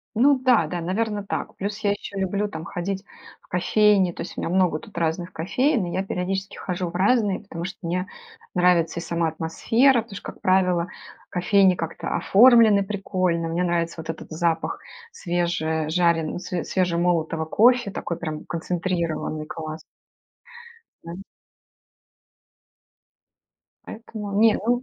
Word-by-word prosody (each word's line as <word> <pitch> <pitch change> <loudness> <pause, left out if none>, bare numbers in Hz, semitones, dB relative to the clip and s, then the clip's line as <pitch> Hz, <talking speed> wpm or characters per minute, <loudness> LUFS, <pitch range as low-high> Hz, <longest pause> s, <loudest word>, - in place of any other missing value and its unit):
Ну 270 +5 +5
да-да. 215 - +2
Наверно, 205 +4 -2
так. - - -4
Плюс 200 +1 -4
я 205 - +3
ещё 200 0 -7
люблю 200 +2 -1
там, 160 -5 -7
ходить 190 +3 -4 0.4
в - - -27
кофейни. 195 0 +3
То - - -6
есть - - -9
у - - -3
меня - - -2
много 180 -4 +2
тут 210 +3 -14
разных 170 +2 -1
кофеен, 215 - 0
и 175 - -5
я 190 - 0
периодически 195 +1 -3
хожу 180 -1 -3
в - - -16
разные, 200 +1 +2
потому 170 -5 -7
что 190 - -6
мне 180 +2 -1 0.5
нравится 175 -2 +2
и - - -7
сама 170 0 -1
атмосфера. 225 - +2
Потому 215 -3 -11
что, - - -7
как - - -22
правило, 180 -2 +2 0.4
кофейни 185 +1 +4
как-то 165 -1 -5
оформлены 225 -2 +6
прикольно. 185 -4 -1
Мне 170 +2 -1
нравится 170 -1 -1
вот 160 - -10
этот 165 - -8
запах 165 +1 -1 0.3
свежежарен 170 - 0
све 175 -1 -4
свежемолотого 170 -3 0
кофе, 235 +6 +3
такой 175 -2 -4
прям 155 -2 -5
концентрированный. 170 -3 -2
Класс. 155 0 -6 1.3
М 170 +3 -7 2.6
Поэтому 215 -2 -7
Не, 225 -1 +6
ну 245 +3 0
180 Hz, 140 wpm, -24 LUFS, 170-205 Hz, 2.6 s, оформлены